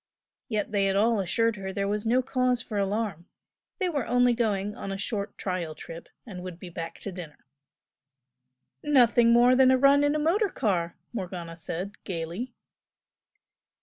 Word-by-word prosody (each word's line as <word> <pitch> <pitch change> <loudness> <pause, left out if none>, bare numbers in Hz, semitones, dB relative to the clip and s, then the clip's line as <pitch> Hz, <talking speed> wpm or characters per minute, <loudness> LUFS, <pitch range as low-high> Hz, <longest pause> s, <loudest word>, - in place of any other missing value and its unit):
Yet 210 -3 -2
they 200 -2 +2
had 195 0 +1
all 220 +2 +3
assured 220 +4 +1
her 190 -1 -5
there 200 +1 -2
was 210 +2 -2
no 250 +3 +3
cause 255 -1 +1
for 215 -4 -4
alarm, 195 -4 -2 0.5
they 375 - 0
were 290 -8 -2
only 245 0 +4
going 210 -3 -1
on 195 - -6
a 195 - -3
short 200 0 -4
trial 180 -5 -3
trip 165 +2 -10 0.2
and 190 -6 -8
would 180 -2 -7
be 180 0 -9
back 165 0 -6
to 200 - -5
dinner. 175 -5 -10 1.4
"Nothing 240 -5 +5
more 240 +2 +6
than 260 0 +6
a 260 - +5
run 280 +2 +5
in 290 +1 +2
a - - +2
motor 360 +8 +2
car!" 180 - -1 0.2
Morgana 180 -5 -5
said, 180 +4 -6
gaily. 180 +7 -4
210 Hz, 170 wpm, -27 LUFS, 185-245 Hz, 1.4 s, more